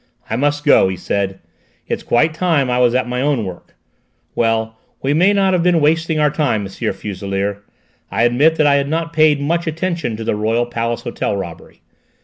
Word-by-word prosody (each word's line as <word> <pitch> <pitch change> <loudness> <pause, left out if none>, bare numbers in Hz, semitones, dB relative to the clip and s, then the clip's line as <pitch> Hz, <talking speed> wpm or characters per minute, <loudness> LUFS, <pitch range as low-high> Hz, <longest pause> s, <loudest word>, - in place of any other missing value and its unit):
"I - - +1
must 145 +3 0
go," 145 - +5
he 95 -1 -3
said; 95 +1 -2 0.5
"it's - - -2
quite 155 +6 +2
time 155 -6 +1
I 125 - +1
was 125 -1 +3
at 130 -1 +1
my 125 +1 -2
own 135 -6 0
work. 90 -2 -9 0.6
Well, 115 -1 0 0.3
we 135 +2 +1
may 180 +6 +4
not 195 -2 +2
have 180 - +2
been 175 -1 +3
wasting 160 +1 +1
our 150 -1 +3
time, 135 -9 0
M. 100 - -6
Fuselier. 100 +1 -3 0.5
I 115 - 0
admit 140 +7 +3
I 145 -2 +4
had 140 0 -1
not 165 +1 -2
paid 155 -2 +4
much 170 +4 -1
attention 165 -7 -2
to 115 - -5
the 110 - -1
Royal 110 +3 0
Palace 115 0 -3
Hotel 100 - -3
robbery. 85 -4 -8
135 Hz, 190 wpm, -18 LUFS, 110-160 Hz, 0.6 s, go